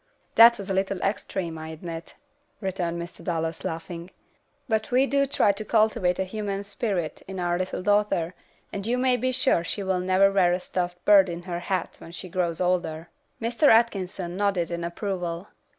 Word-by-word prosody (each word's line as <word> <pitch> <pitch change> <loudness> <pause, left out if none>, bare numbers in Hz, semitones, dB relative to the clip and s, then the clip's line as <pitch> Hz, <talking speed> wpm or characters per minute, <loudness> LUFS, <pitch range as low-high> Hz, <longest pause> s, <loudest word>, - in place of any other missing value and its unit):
"That 235 +1 +8
was 200 - -7
a 195 - -1
little 190 0 0
extreme, 180 -5 -2
I 160 - -7
admit," 165 +1 -7 0.4
returned 180 -4 -2
Mr. 170 +1 -8
Dallas, 165 -2 -2
laughing, 170 +1 -5 0.6
"but 220 -2 0
we 255 +2 +4
do 275 +1 +2
try 235 -6 +3
to 200 +2 -5
cultivate 215 -4 +2
a 190 - +1
humane 200 0 -4
spirit 200 -5 -3
in 190 -1 -6
our 175 -1 0
little 185 0 -3
daughter, 205 -4 +2 0.4
and 200 +1 -4
you 245 +2 +1
may 255 0 +3
be 255 +2 0
sure 255 -9 +2
she 200 +4 -3
will 190 -1 0
never 190 +2 +4
wear 185 -3 +4
a 180 - 0
stuffed 180 -1 -4
bird 195 -3 +7
in 170 0 -5
her 175 -1 -4
hat 185 -1 -2
when 165 - -11
she 180 +2 -5
grows 175 -2 -1
older." 175 -3 -1 0.3
Mr. 235 +6 +2
Atkinson 195 -6 +2
nodded 195 -4 0
in 170 0 -3
approval. 175 0 -4
185 Hz, 180 wpm, -26 LUFS, 175-210 Hz, 0.6 s, That